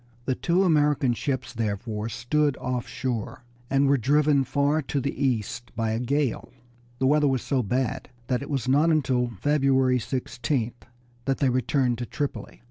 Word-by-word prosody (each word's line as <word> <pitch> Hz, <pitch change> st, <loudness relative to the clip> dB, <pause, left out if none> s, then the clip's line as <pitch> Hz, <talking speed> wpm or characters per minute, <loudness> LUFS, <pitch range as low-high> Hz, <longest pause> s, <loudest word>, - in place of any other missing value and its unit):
The 130 Hz, -, +1 dB
two 175 Hz, +8 st, +1 dB
American 150 Hz, -6 st, +3 dB
ships 125 Hz, 0 st, -3 dB
therefore 110 Hz, -1 st, -3 dB
stood 145 Hz, +4 st, 0 dB
offshore, 125 Hz, -2 st, -3 dB, 0.3 s
and 135 Hz, +1 st, +3 dB
were 140 Hz, 0 st, +3 dB
driven 145 Hz, +3 st, +3 dB
far 140 Hz, +4 st, +1 dB
to 140 Hz, 0 st, -2 dB
the 140 Hz, +1 st, -2 dB
east 120 Hz, -2 st, -1 dB
by 115 Hz, -1 st, 0 dB
a 110 Hz, -, -1 dB
gale. 135 Hz, +1 st, -1 dB, 0.5 s
The 130 Hz, -, 0 dB
weather 150 Hz, +2 st, +4 dB
was 130 Hz, -2 st, 0 dB
so 135 Hz, -3 st, +1 dB
bad 125 Hz, +2 st, -2 dB, 0.2 s
that 125 Hz, +1 st, -1 dB
it 140 Hz, -, -7 dB
was 135 Hz, -3 st, -2 dB
not 145 Hz, +5 st, +4 dB
until 130 Hz, -6 st, +2 dB
February 135 Hz, -3 st, +3 dB
16th 120 Hz, -1 st, -3 dB, 0.4 s
that 135 Hz, -1 st, +1 dB
they 135 Hz, -, +2 dB
returned 125 Hz, -1 st, +1 dB
to 120 Hz, -, -4 dB
Tripoli. 145 Hz, -1 st, -4 dB
130 Hz, 160 wpm, -26 LUFS, 120-145 Hz, 0.5 s, weather